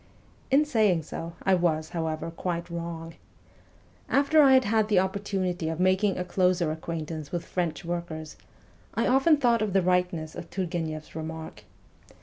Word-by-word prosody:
In 280 +3 +4
so 300 - -14 0.3
saying, - - -16 0.4
I 190 - +3
was, 160 -3 +1
however, 160 -1 -3
quite 170 0 -4
wrong. 165 -1 -5 1.0
After 285 +3 +4
I 270 -2 +7
had 260 0 +6
had 220 0 +2
the 210 -3 +2
opportunity 185 -3 -1
of 165 +1 -4
making 190 +2 +2
a 180 - -2
closer 180 -2 +1
acquaint 160 0 -5
ance 155 -3 -6
with 170 -1 -3
French 175 -2 -2
workers, 170 -2 -5 0.6
I - - +1
often 270 +5 +4
thought 240 -5 +3
of 210 -3 -1
the 195 - +4
Tightness 180 -3 0
of - - -8
Turgueneff's 165 -5 -4
remark. 160 0 -7
175 Hz, 155 wpm, -27 LUFS, 160-195 Hz, 1.0 s, I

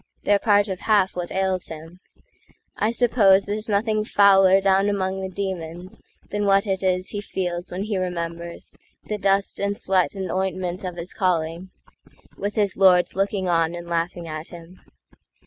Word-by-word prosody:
They're 205 0 +3
part 205 -2 +3
of 190 -2 -4
half 205 -4 +2
what 175 -1 -4
ails 190 -1 -1
him: 165 +3 -10 0.8
I 215 - 0
supposeThere's 215 -3 +2
nothing 215 +1 +1
fouler 195 -2 +5
down 195 +1 +2
among 190 -1 -2
the 190 - -4
demonsThan 185 +2 -6
what 195 +1 +4
it 190 -2 -1
is 185 -1 0
he 205 - -4
feels 180 -3 -4
when 185 +2 -4
he 210 -2 -2
remembersThe 170 +3 -6
dust 195 +1 +1
and 200 0 -1
sweat 185 -4 +1
and 190 -1 -4
ointment 185 -1 -2
of 180 -2 -5
his 170 +1 -7
callingWith 185 +3 -4
his 205 -3 +1
lords 180 -2 +4
looking 195 -1 -1
on 165 -1 +1
and 175 0 -7
laughing 170 0 -2
at 155 0 -6
him. 175 +1 -13
190 Hz, 150 wpm, -23 LUFS, 175-200 Hz, 0.8 s, fouler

